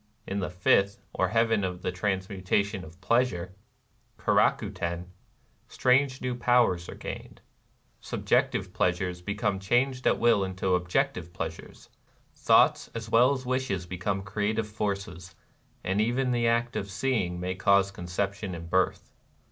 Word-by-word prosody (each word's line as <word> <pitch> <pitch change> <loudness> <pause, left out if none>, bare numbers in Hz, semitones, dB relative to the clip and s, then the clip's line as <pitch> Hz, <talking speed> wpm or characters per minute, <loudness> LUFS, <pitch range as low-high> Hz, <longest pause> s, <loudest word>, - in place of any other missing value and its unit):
In 100 - -3
the 90 -2 -2
fifth, 95 +2 +2
or - - +1
Heaven 115 -1 +2
of 90 -1 -4
the - - -1
Transmutation 95 +1 -1
of 80 +3 -13
Pleasure 100 -7 +1 0.6
(Keraku - - +2
Ten)^ 85 +1 -4 0.6
strange 130 +1 +2
new 125 -1 -1
powers 120 -8 +2
are - - -7
gained. - - -8 0.6
Sub - - -6
jective - - +1
pleasures 90 0 0
become 100 +1 -1
changed 125 +6 +1
at - - +3
will 115 -4 +3
into 95 0 -1
objective 90 - 0
pleasures; - - -7 0.3
— - - -37
thoughts - - +4
as 110 -1 -6
well 120 +4 +6
as 130 -2 -3
wishes 125 -8 -1
become 95 +2 -3
creative 105 +3 -1
forces; 100 -5 -4 0.2
— - - -37
and 95 +3 +1
even 125 +3 +1
the 120 -1 +1
act 120 +1 +1
of 100 - -3
seeing 100 -4 -1
may 90 +1 -2
cause 100 +1 +3
conception 95 +1 -3
and 85 0 -9
birth. 95 0 0
100 Hz, 150 wpm, -28 LUFS, 90-115 Hz, 0.6 s, well